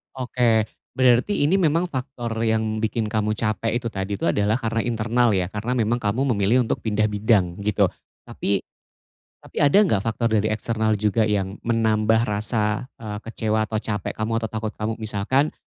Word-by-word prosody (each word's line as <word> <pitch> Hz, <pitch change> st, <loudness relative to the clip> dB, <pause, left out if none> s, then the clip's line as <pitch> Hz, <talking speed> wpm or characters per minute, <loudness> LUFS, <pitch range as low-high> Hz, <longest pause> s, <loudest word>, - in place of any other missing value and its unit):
Oke, 120 Hz, -3 st, +2 dB, 0.3 s
berarti 130 Hz, -, +3 dB
ini 185 Hz, +7 st, +3 dB
memang 170 Hz, +1 st, +2 dB
faktor 125 Hz, -4 st, -4 dB
yang 110 Hz, -1 st, 0 dB
bikin 110 Hz, 0 st, -1 dB
kamu 105 Hz, -1 st, 0 dB
capek 110 Hz, 0 st, -1 dB
itu 120 Hz, -1 st, -2 dB
tadi 95 Hz, +1 st, -3 dB
itu -, -, -8 dB
adalah 105 Hz, +4 st, +2 dB
karena 115 Hz, -2 st, -1 dB
internal 115 Hz, -1 st, +1 dB
ya, 90 Hz, 0 st, -1 dB
karena 115 Hz, +4 st, -2 dB
memang 120 Hz, +1 st, +1 dB
kamu 125 Hz, +6 st, 0 dB
memilih 110 Hz, +6 st, +3 dB
untuk -, -, -2 dB
pindah 105 Hz, -1 st, 0 dB
bidang, 100 Hz, -4 st, +1 dB
gitu. 100 Hz, -3 st, +2 dB, 0.3 s
Tapi, 100 Hz, -1 st, -2 dB, 0.8 s
tapi -, -, -17 dB
ada 145 Hz, +6 st, +4 dB
gak 105 Hz, -, +1 dB
faktor 115 Hz, +1 st, 0 dB
dari 105 Hz, +1 st, +1 dB
eksternal 110 Hz, 0 st, 0 dB
juga 105 Hz, +1 st, +1 dB
yang 100 Hz, -1 st, -1 dB
menambah 110 Hz, 0 st, +2 dB
rasa, 105 Hz, +3 st, -1 dB
eee, 105 Hz, -2 st, -5 dB
kecewa 110 Hz, -1 st, -1 dB
atau 110 Hz, 0 st, -2 dB
capek 105 Hz, -5 st, -3 dB
kamu 110 Hz, +1 st, -2 dB
atau 110 Hz, -, -2 dB
takut 110 Hz, -1 st, -3 dB
kamu 110 Hz, +1 st, -3 dB
misalkan 110 Hz, +7 st, 0 dB
110 Hz, 170 wpm, -23 LUFS, 105-120 Hz, 0.8 s, ada